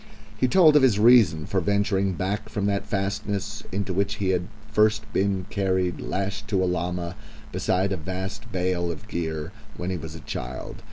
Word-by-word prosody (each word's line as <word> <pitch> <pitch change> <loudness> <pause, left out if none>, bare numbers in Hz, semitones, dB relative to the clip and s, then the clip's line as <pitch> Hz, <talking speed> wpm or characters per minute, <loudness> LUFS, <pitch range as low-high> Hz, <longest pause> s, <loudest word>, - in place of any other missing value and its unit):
He 130 - +2
told 160 0 +6
of 150 - +7
his 125 -6 +4
reason 105 -9 +6
for 95 +2 0
venturing 100 0 +1
back 100 +4 -2
from 100 -2 -2
that 100 -1 0
fastness, 100 +1 -2
into 100 -1 -2
which 100 +2 0
he 100 -3 -1
had 90 -1 +1 0.2
first 110 +1 +3
been 95 -1 +1
carried 95 -3 0
lashed 95 +1 -3
to 95 -3 +1
a - - +2
llama, 90 0 -2 0.4
beside 95 +2 +1
a 95 - 0
vast 95 +6 -5
bale 90 -2 0
of 85 +6 -9
gear, 80 -5 -3 0.3
when 90 +1 -3
he 90 - -1
was 80 0 -7
a - - -7
child. 65 -4 -6
95 Hz, 180 wpm, -25 LUFS, 90-100 Hz, 0.4 s, of